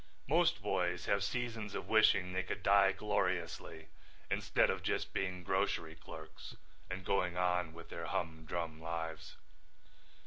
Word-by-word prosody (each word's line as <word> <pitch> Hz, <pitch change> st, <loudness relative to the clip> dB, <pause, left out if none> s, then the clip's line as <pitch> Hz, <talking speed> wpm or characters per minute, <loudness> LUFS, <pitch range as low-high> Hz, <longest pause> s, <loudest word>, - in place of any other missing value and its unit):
Most 160 Hz, -, +3 dB
boys 90 Hz, -3 st, 0 dB
have 100 Hz, 0 st, +2 dB
seasons 115 Hz, -2 st, -2 dB
of -, -, -4 dB
wishing 95 Hz, -4 st, +4 dB
they 95 Hz, -, +1 dB
could 95 Hz, +1 st, -5 dB
die 100 Hz, 0 st, +6 dB
gloriously 90 Hz, -5 st, -2 dB, 0.4 s
instead -, -, +3 dB
of -, -, -3 dB
just -, -, -1 dB
being 90 Hz, -2 st, -2 dB
grocery 90 Hz, -3 st, 0 dB
clerks -, -, -10 dB, 0.3 s
and 95 Hz, +1 st, -5 dB
going 90 Hz, -3 st, +1 dB
on 90 Hz, -2 st, +1 dB
with 85 Hz, +1 st, -11 dB
their 85 Hz, -1 st, -5 dB
humdrum 80 Hz, 0 st, -3 dB
lives. 80 Hz, -1 st, -4 dB
90 Hz, 135 wpm, -35 LUFS, 85-100 Hz, 0.4 s, die